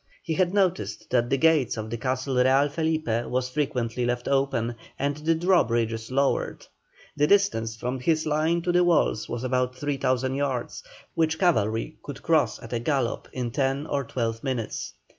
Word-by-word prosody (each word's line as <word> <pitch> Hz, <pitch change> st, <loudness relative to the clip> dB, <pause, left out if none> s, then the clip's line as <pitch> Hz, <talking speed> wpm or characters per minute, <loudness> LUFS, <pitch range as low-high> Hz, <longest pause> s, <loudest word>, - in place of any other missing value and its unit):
He 165 Hz, -, -2 dB
had 180 Hz, +1 st, +2 dB
noticed 180 Hz, -, 0 dB
that 120 Hz, -1 st, +2 dB
the 135 Hz, -, +2 dB
gates 150 Hz, -6 st, +3 dB
of 110 Hz, 0 st, -5 dB
the 115 Hz, -, -2 dB
Castle 130 Hz, +1 st, -1 dB
Real 130 Hz, +3 st, +4 dB
Felipe 160 Hz, +1 st, -1 dB, 0.2 s
were 130 Hz, +1 st, 0 dB
frequently 125 Hz, -3 st, -2 dB
left 120 Hz, 0 st, -1 dB
open, 135 Hz, -4 st, +1 dB, 0.2 s
and 140 Hz, +1 st, -1 dB
the 160 Hz, +2 st, +1 dB
drawbridges 115 Hz, -11 st, +1 dB
lowered. 135 Hz, +1 st, 0 dB, 0.5 s
The 150 Hz, 0 st, +3 dB
distance 150 Hz, -, +2 dB
from 125 Hz, +3 st, -3 dB
his 155 Hz, +4 st, +1 dB
line 160 Hz, +3 st, +1 dB
to 175 Hz, -, +1 dB
the 180 Hz, 0 st, +4 dB
walls 170 Hz, -10 st, +2 dB
was 120 Hz, +1 st, -4 dB
about 125 Hz, 0 st, 0 dB
3,000 130 Hz, -2 st, 0 dB
yards, 135 Hz, -3 st, -2 dB, 0.3 s
which 160 Hz, -1 st, +1 dB
cavalry 115 Hz, -, +1 dB
could 145 Hz, -2 st, -9 dB
cross 160 Hz, -3 st, +2 dB
at -, -, -8 dB
a 120 Hz, -, 0 dB
gallop 130 Hz, -1 st, -1 dB
in 125 Hz, -2 st, -3 dB
ten 135 Hz, +2 st, 0 dB
or 140 Hz, -3 st, -1 dB
twelve 115 Hz, -2 st, -3 dB
minutes. 125 Hz, -5 st, -3 dB
135 Hz, 170 wpm, -26 LUFS, 120-155 Hz, 0.5 s, Real